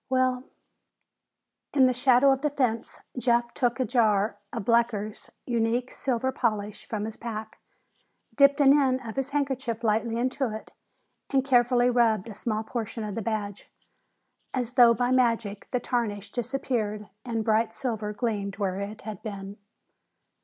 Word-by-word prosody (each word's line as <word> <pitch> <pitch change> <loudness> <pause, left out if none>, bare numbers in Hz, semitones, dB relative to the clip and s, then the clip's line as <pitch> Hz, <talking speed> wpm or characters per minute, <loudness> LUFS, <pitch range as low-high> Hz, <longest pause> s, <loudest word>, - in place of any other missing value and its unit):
"Well 255 0 +1 0.7
" - - -59
In 265 -2 +6
the 255 - +3
shadow 255 +1 +5
of 270 0 +1
the 300 - +1
fence, 245 -5 -1 0.2
Jeff 240 -1 +1
took 240 -1 0
a 255 - +2
jar 215 -4 +2
of - - -5
Blecker's 230 -3 0 0.2
Unique 240 +1 0
Silver 260 0 -1
Polish 215 -5 -2
from 210 -2 -3
his 220 0 -6
pack, 220 -2 -6 0.7
dipped 280 +1 +5
an 280 0 +7
end 260 -3 +2
of 225 - -6
his 270 0 -2
handkerchief 265 -5 -2
lightly 225 +1 +1
into 255 0 -1
it, 220 - -9 0.6
and 270 -1 +1
carefully 245 -1 +4
rubbed 230 -4 +2
a 220 - -7
small 215 +1 -2
portion 225 0 -4
of 210 -1 -4
the 225 - -3
badge. 210 -2 -4 0.9
As 245 -2 -1
though 240 -2 +6
by 245 +1 0
magic, 230 -5 +1
the 250 - 0
tarnish 215 -5 -2
disappeared 235 -4 -2 0.2
and 225 -3 -2
bright 220 +1 +2
silver 220 -5 -3
gleamed 205 -3 -2
where 195 -2 -1
it 205 +2 -6
had 215 -1 -7
been. 200 -2 -7
235 Hz, 155 wpm, -27 LUFS, 215-255 Hz, 0.9 s, an